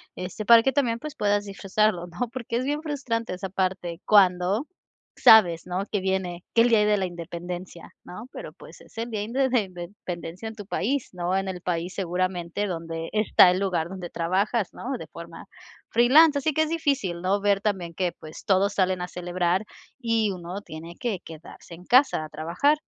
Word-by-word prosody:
este, 185 +4 -6
para 230 0 +8
que 270 - +2
también, 235 -4 +1
pues, 305 +3 -7
puedas 205 -4 +1
disfrutarlo, 195 -2 0
¿no?, 180 +8 -4
porque 235 -2 -3
es 255 - -1
bien 295 +2 -1
frustrante 250 - -3
esa 190 +1 -5
parte 185 -2 -2
cuando 195 - +4 0.5
sabes, 180 -7 +6
¿no?, 180 +2 -2
que 205 - +1
viene, 185 -2 -2
que 230 - +6
el 240 - +4
día 215 -3 +4
de 210 0 +3
la 190 - 0
independencia, 175 0 -7
¿no?, 215 +7 -9
pero, - - -8
pues, - - -14
es - - -19
el 230 +1 -3
día 215 -2 -2
inde 260 +5 0
den 215 -7 0
dependencia 175 +1 -7
en 220 - -7
tu 205 -2 -9
país, 255 +7 -1
no, 180 +1 -1
en 195 0 -1
el 180 -1 -6
país 175 0 -2
seguramente 185 0 -2
donde 165 -2 -5
está 215 -4 +6
el 180 - 0
lugar 175 -4 -1
donde 185 -2 -7
trabajas, 190 +5 0
¿no?, 265 +1 -4
de 160 - -9
forma 170 +2 -11 0.4
freelance 285 +6 +6
así 310 +2 0
que 315 - +3
es 310 - -3
difícil, 280 - -1
¿no?, 195 +3 +1
ver 200 -1 +3
también 190 -5 -2
que 180 0 -1
pues 155 0 -12
todos 200 0 +2
salen 185 -1 +1
a 180 - -4
celebrar 180 +2 -1 0.3
y 230 -4 +1
uno 180 +2 -6
tiene 165 -1 -10
que 230 -7 -2
quedarse 165 +1 -12
en 175 - -15
casa 255 - +4
a 155 - -8
trabajar, 170 - +1
190 Hz, 195 wpm, -25 LUFS, 175-230 Hz, 0.5 s, para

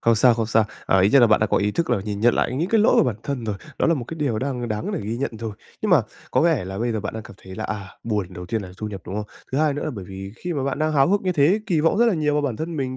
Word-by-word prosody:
Không 115 0 +4
sao, 120 +1 +5
không 115 -1 -1
sao. 110 -1 +3 0.2
À, 95 - +4
ít 95 - +5
nhất 135 +3 +6
là 120 - +7
bạn 110 -1 +4
đã 110 - +3
có - - +1
ý 105 +1 +2
thức 170 +9 -1
là - - +2
nhìn 105 -1 -4
nhận 120 +1 +4
lại - - 0
những 170 +6 0
cái 225 -2 +3
lỗi 220 - +5
của - - +6
bản 120 -5 -1
thân 140 -4 -3
rồi, 105 -2 -2 0.2
đó - - +2
là 165 - +4
một 130 -6 -4
cái 165 - -7
điều 125 -7 0
đang 125 -2 -3
đáng 105 0 -3
để - - -2
ghi 110 +3 -3
nhận 135 +3 -2
rồi. 115 -2 -4 0.3
Nhưng 215 - 0
mà 150 -9 +6 0.3
có - - +2
vẻ 160 - +2
là 95 +1 -5
bây 120 0 0
giờ 110 - -2
bạn 110 - -5
đang 110 - -5
cảm 100 - -12
thấy 95 0 -10
là, 110 +2 -5
à, 100 -3 -4 0.2
buồn, 105 -4 -1
đầu 90 0 -8
tiên 110 +2 -2
là 90 - -9
thu 110 - -4
nhập, 100 -2 -7
đúng 95 - -5
không? 105 0 -2 0.3
Thứ 135 - +1
hai 150 -2 +2
nữa 145 - -3
là - - -2
bởi 100 -4 -7
vì 95 +1 -8
khi 175 -1 -4
mà 140 -4 -2
bạn 140 +1 -2
đang 155 0 +1
háo 140 +1 +4
hức 205 +1 +3
như 185 -2 0
thế, 170 +7 +3
kỳ 170 -6 +2
vọng 165 +6 +2
rất 240 - +5
là 220 - +3
nhiều 150 -2 +1
vào 150 - +1
bản 125 -6 -1
thân 165 +1 -4
mình 130 -2 -2
120 Hz, 365 wpm, -23 LUFS, 105-150 Hz, 0.3 s, là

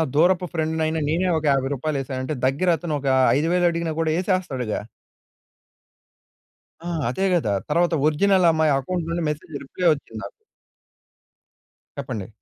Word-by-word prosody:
దూరపు 180 +3 +3
ఫ్రెండ్‌నైన 160 0 -1
నేనే 175 +4 +1
ఒక 160 - -4
50 135 -1 +1
రూపాయలేసానంటే 135 -1 -3
దగ్గర 140 +8 +1
అతను 170 -2 -4
ఒక 140 - -5 0.3
5000 175 +4 +1
అడిగినా 170 -1 -2
గూడా 160 -1 +1
యేసేస్తాడుగా? 175 - -1 2.0
ఆ! - - -6 0.2
అదే 190 +10 -1
గదా! 155 -12 +1 0.2
తర్వాత 170 +3 +2
ఒరిజినల్ 185 +4 +3
అమ్మాయి 160 -1 +2
అకౌంట్ 170 +4 -3
నుండి 170 0 -2
మెసేజ్ 150 +1 -6
రిప్లై 175 +6 -2
వచ్చింది 115 -6 -9
నాకు. 100 - -6 1.7
చెప్పండి? 115 -8 -5
160 Hz, 125 wpm, -23 LUFS, 135-175 Hz, 2.0 s, దూరపు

